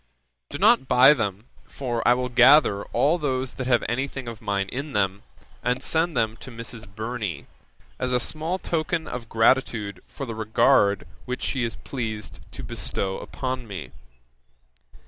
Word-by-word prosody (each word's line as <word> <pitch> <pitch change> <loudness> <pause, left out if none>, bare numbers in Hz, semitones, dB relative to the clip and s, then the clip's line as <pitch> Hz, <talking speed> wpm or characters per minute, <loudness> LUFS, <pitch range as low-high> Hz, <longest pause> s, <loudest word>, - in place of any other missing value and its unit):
Do - - -5
not 130 - +4
buy 130 +4 +7
them, 105 -5 -3 0.2
for 120 -4 -3
I 120 - +6
will 125 0 -1
gather 125 -4 +6
all 145 +8 +2
those 130 -3 -1
that 130 - -5
have 120 -2 +3
anything 130 +1 -3
of 115 -2 -7
mine 100 -2 -1
in 140 +3 -5
them, 95 -1 0 0.4
and 125 +2 -1
send 160 -1 +1
them 110 -1 +1
to 135 - -10
Mrs. 115 -2 -8
Burney, 110 -1 -4 0.5
as 125 - -1
a 125 - +3
small 160 +8 -2
token 165 -2 -2
of 120 -2 -6
gratitude 110 -5 +2
for 140 - -6
the 115 - -5
regard 110 -2 +3 0.2
which 125 0 -4
she 130 - -1
is 115 - -2
pleased 110 -5 -5
to - - -8
bestow 95 -1 -3
upon 130 -2 -4
me. 90 - -7
120 Hz, 160 wpm, -25 LUFS, 110-135 Hz, 0.5 s, buy